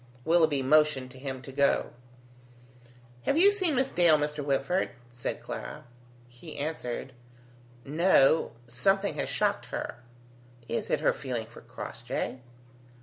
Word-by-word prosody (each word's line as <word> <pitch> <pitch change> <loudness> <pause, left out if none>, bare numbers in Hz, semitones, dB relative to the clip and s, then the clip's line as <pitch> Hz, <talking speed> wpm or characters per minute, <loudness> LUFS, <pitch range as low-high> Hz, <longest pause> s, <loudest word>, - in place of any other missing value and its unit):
Willoughby 160 -4 +3
motioned 145 -2 +3
to 130 - -12
him 130 -1 -5
to 135 - -9
go. 140 +1 +2 1.4
"Have - - +3
you 390 +4 +7
seen 370 -7 +1
Miss 265 +1 +1
Dale, 170 -3 +5
Mr. 150 0 -2
Whitford?" 140 +6 0 0.2
said 120 0 -5
Clara. - - -6 0.4
He 120 +7 -11
answered, 140 -4 -4 0.7
"No. 160 0 +4
Something 195 +12 +1
has - - -2
shocked - - 0
her." - - -4 0.7
"Is 115 - -2
it 150 - +1
her - - +3
feeling 125 -5 -4
for 115 - -14
Crossjay?" 120 +1 -5
145 Hz, 130 wpm, -29 LUFS, 130-165 Hz, 1.4 s, you